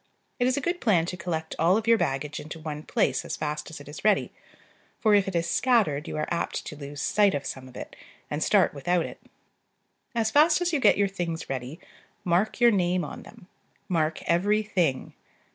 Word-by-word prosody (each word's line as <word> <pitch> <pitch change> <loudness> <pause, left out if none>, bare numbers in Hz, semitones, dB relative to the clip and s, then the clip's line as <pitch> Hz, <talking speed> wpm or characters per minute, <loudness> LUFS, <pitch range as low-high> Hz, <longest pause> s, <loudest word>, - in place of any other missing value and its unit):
It 245 - +3
is 255 - +1
a - - 0
good 350 +3 -2
plan 180 -8 +3
to 180 - -4
collect 160 -3 -4
all 175 +5 +4
of 220 - -3
your 230 -1 +4
baggage 135 +2 -2
into 155 +2 -8
one 155 -2 -6
place - - 0
as - - -5
fast 150 0 -4
as 160 - -9
it 145 - -13
is 145 - -9
ready; 210 -1 +2 0.7
for 215 -2 +3
if 200 -1 +4
it 190 - -3
is 170 0 0
scattered 185 - +2
you - - -4
are 155 - 0
apt 170 - -2
to 150 - -7
lose 145 0 -8
sight 205 +2 +3
of 140 - -4
some 130 -1 -6
of 130 - -12
it, - - -8 0.3
and 150 +1 -4
start 195 +3 +3
without 170 +4 0
it. - - -9 1.0
As 220 -1 +1
fast 305 +4 +5
as 355 -1 -1
you 300 - +2
get - - +5
your 200 0 +3
things 170 -6 -4
ready, 130 +5 -5 0.4
mark 180 +7 +1
your 240 -1 +6
name 180 -3 +1
on - - -8
them: 215 -5 -15 0.4
mark 160 -4 0
every 205 +5 +2
thing. 180 -10 -1
175 Hz, 210 wpm, -26 LUFS, 155-215 Hz, 1.0 s, your